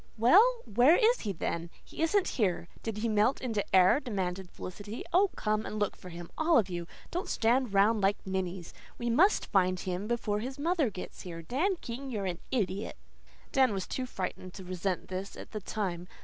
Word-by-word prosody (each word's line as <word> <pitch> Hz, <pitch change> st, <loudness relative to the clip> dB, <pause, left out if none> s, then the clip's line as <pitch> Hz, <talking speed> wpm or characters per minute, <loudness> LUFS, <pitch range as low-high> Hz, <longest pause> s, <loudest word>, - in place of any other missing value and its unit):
"Well, 425 Hz, -, +5 dB
where 245 Hz, -, +5 dB
is 475 Hz, +3 st, +4 dB
he, 210 Hz, -, -2 dB
then? 170 Hz, -1 st, -3 dB
He -, -, -8 dB
isn't 375 Hz, +4 st, +2 dB
here. 185 Hz, -7 st, 0 dB
Did 225 Hz, -2 st, -4 dB
he 225 Hz, +2 st, -1 dB
melt 215 Hz, +4 st, +2 dB
into 225 Hz, -5 st, -1 dB
air?" 185 Hz, +7 st, +6 dB
demanded 190 Hz, -7 st, -3 dB
Felicity. 205 Hz, +6 st, -7 dB
"Oh, 385 Hz, +3 st, +5 dB
come 215 Hz, 0 st, 0 dB
and 215 Hz, -, -5 dB
look 205 Hz, -1 st, 0 dB
for 180 Hz, -, -11 dB
him, 170 Hz, 0 st, -9 dB
all 320 Hz, +1 st, +4 dB
of 200 Hz, -5 st, +2 dB
you. 175 Hz, -1 st, -4 dB, 0.2 s
Don't 355 Hz, +2 st, -3 dB
stand 240 Hz, +1 st, +2 dB
round 205 Hz, +2 st, +4 dB
like 195 Hz, +1 st, +3 dB
ninnies. 190 Hz, -2 st, -3 dB, 0.2 s
We 240 Hz, -1 st, -1 dB
MUST 360 Hz, -, +4 dB
find 185 Hz, -2 st, +3 dB
him 185 Hz, +3 st, -3 dB
before 220 Hz, -3 st, -1 dB
his 260 Hz, +4 st, -5 dB
mother 315 Hz, -3 st, +1 dB
gets 185 Hz, -3 st, -8 dB
here. 165 Hz, -2 st, -7 dB
Dan 315 Hz, -, 0 dB
King, 265 Hz, +3 st, -6 dB
you're 210 Hz, -6 st, -3 dB
an 180 Hz, -2 st, -3 dB
idiot!" 200 Hz, -4 st, -2 dB, 0.5 s
Dan 265 Hz, -6 st, +4 dB
was 190 Hz, -, -2 dB
too 255 Hz, -1 st, -3 dB
frightened 185 Hz, -3 st, -5 dB
to 190 Hz, -, -8 dB
resent 185 Hz, 0 st, -3 dB
this, 190 Hz, +1 st, -5 dB
at -, -, -10 dB
the 215 Hz, -, -5 dB
time. 180 Hz, -4 st, -3 dB
210 Hz, 195 wpm, -30 LUFS, 185-255 Hz, 0.5 s, air